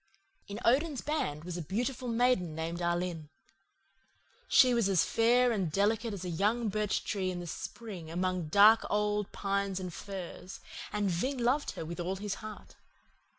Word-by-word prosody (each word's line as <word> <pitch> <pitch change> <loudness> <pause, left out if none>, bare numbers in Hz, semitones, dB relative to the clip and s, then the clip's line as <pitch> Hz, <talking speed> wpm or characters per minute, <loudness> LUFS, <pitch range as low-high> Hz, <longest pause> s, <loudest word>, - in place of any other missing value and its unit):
"In 205 +2 -6
Odin's 280 +3 +2
band 155 - -2
was 175 0 -5
a - - -3
beautiful 245 - -2
maiden 230 -9 +1
named 165 +2 -3
Alin. 170 -3 -2 1.2
She 255 -1 +6
was 230 -4 +2
as 190 -4 +3
fair 240 +2 +3
and 190 -8 -1
delicate 220 +5 +1
as 190 -3 -6
a - - -3
young 215 +6 +1
birch 210 0 -1
tree 190 -3 -1
in 175 -1 -4
spring 190 -1 -7
among 180 0 -1
the - - -9
dark 210 +6 +7
old 210 -1 0
pines 200 -1 -1
and 180 -2 -5
firs, 190 -1 -7 0.3
and 205 -2 0
Ving 255 +11 -1
loved 255 +5 +1
her - - -6
with 170 +2 -6
all 180 +2 -2
his 200 +1 -3
heart. 215 -1 -10
200 Hz, 165 wpm, -31 LUFS, 175-230 Hz, 1.2 s, dark